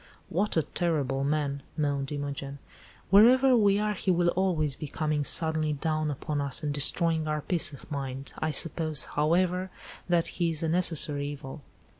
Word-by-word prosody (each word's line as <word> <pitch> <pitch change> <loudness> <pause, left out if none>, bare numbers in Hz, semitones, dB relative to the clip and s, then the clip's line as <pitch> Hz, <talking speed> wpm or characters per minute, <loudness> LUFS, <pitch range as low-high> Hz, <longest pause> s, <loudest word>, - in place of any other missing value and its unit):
"What 195 +2 0
a 160 - +3
terrible 140 -5 -1
man!" 140 -1 -1 0.2
moaned 140 -2 -1
Imogen. 140 -1 -5 0.5
"Wherever 250 +6 +6
we 200 -3 +3
are 210 0 0
he 195 - -4
will 175 -1 +3
always 170 -7 0
be 150 - -7
coming 150 0 -1
suddenly 155 0 0
down 155 +1 -1
upon 145 +1 -3
us 140 +2 -2
and 145 -1 -1
destroying 160 +2 +2
our 150 0 -1
peace 170 +1 +1
of 140 - -13
mind. 135 -1 -5
I 155 - -1
suppose, 155 -1 +1
however, 180 +5 +1 0.4
that 170 -1 +2 0.2
he 170 - +3
is 160 -1 -1
a 165 - 0
necessary 160 -4 +1
evil." 145 0 -8
155 Hz, 165 wpm, -28 LUFS, 145-175 Hz, 0.5 s, Wherever